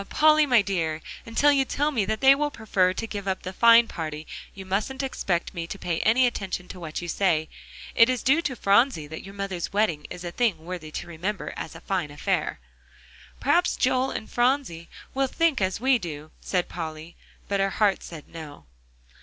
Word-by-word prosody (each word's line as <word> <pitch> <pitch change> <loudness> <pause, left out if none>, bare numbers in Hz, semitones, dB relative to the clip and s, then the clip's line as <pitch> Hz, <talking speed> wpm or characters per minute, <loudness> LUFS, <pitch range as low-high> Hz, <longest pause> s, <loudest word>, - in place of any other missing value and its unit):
Polly, 310 0 +5
my 245 -5 +5
dear, 165 -6 -1 0.3
until 280 +6 +4
you 275 -1 +3
tell 290 +3 -1
me 225 -8 0
that 220 +2 -2
they 270 0 +8
will 295 +1 0
prefer 200 -8 +1
to 205 - -4
give 205 -3 -6
up 190 -1 -2
the 185 - -5
fine 230 +2 +6
party, 155 -4 -5 0.3
you 195 -1 -8
mustn't 210 +9 -2
expect 185 -9 -2
me 170 -2 -4
to 195 - -6
pay 170 -4 -2
any 240 +4 +4
attention 195 -6 -3
to 185 - -9
what 165 0 -5
you - - -5
say. 165 -3 +1 0.5
It's 245 +1 +4
due 300 +6 +4
to 270 -6 -3
Phronsie 200 - +3
that 160 +2 -8
your 195 +1 -11
mother's 195 -3 -4
wedding 200 -7 0
is 180 - -8
a 175 - -4
thing 190 -8 0
worthy 175 -3 -6
to 155 - -5
remember 180 +5 -4
as 160 - -7
a 165 - -10
fine 180 -5 -2
affair." 145 - -2 0.8
"Perhaps 340 +6 +2
Joel 260 +1 +1
and 220 - -5
Phronsie 240 -10 0 0.2
will 270 0 +1
think 320 -2 +1
as 190 0 0
we 260 0 +3
do," 155 -4 -7
said 180 -2 -1
Polly. 160 0 -7 0.3
But 200 -1 0
her 195 0 +2
heart 200 -1 +1
said 160 -3 -10
No. 155 -3 -10
195 Hz, 195 wpm, -25 LUFS, 170-250 Hz, 0.8 s, they